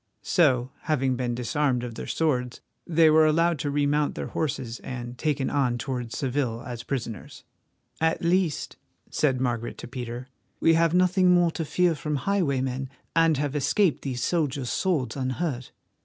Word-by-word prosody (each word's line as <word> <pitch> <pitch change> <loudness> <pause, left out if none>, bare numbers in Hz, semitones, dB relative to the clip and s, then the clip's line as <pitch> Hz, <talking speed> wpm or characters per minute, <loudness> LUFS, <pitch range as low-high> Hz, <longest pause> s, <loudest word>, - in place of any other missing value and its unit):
So, 130 -7 +2
having 135 -4 +1
been 120 -1 -2
disarmed 125 +1 0
of 120 -1 -5
their - - -7
swords, 125 -6 0 0.3
they 165 -2 +5
were 155 0 +6
allowed 165 +1 +2
to 145 - -1
remount 145 +1 +1
their - - -4
horses 125 -6 -3
and 120 -1 -6
taken 140 0 -1
on 130 -4 +1
towards 125 -1 -4
Seville 130 -4 -1
as 120 -2 -6
prisoners. 115 -5 -5 0.6
"At 160 +1 +1
least," 175 -2 0 0.3
said 135 -4 +1
Margaret 120 -2 -2
to - - -8
Peter, 125 0 -6 0.3
"we 165 - +4
have 165 +1 +3
nothing 185 0 +4
more 175 -1 +4
to 165 - -3
fear 175 +2 +2
from 150 -1 -3
highwaymen, 135 -6 -1 0.3
and 165 -2 +4
have 145 0 -2
escaped 170 +4 +2
these 130 -3 -3
soldiers' 145 -7 0
swords 170 -9 0
unhurt." 130 0 -3
140 Hz, 155 wpm, -26 LUFS, 125-160 Hz, 0.6 s, were